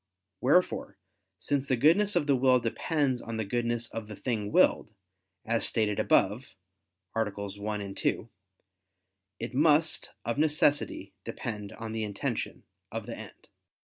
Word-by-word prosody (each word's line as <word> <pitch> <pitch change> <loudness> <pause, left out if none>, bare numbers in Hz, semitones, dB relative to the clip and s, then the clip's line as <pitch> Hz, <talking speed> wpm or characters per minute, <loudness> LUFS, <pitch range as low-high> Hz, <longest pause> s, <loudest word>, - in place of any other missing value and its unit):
Wherefore, 165 +8 +2 0.4
since 140 -1 -1
the 130 - +3
goodness 180 - +4
of 170 -4 +2
the 140 -2 +3
will 130 0 +4
depends 130 +2 0
on 115 -1 -5
the 110 - -1
goodness 120 +2 -1
of 115 -2 -6
the 105 - -8
thing 105 -3 -2
willed, - - +4 0.6
as 115 0 +1
stated 105 -3 +1
above 105 +1 +2 0.6
(AA. 110 -2 +1
1, 100 0 -5
2), - - -1 1.1
it 115 +2 -5
must, 155 +3 +3 0.2
of 115 +4 -1
necessity, 150 -1 +2
depend 105 -3 -5
on 115 -1 -6
the 110 0 -2
intention 100 -2 -3 0.3
of - - -4
the - - -6
end. - - -12
115 Hz, 135 wpm, -29 LUFS, 105-140 Hz, 1.1 s, goodness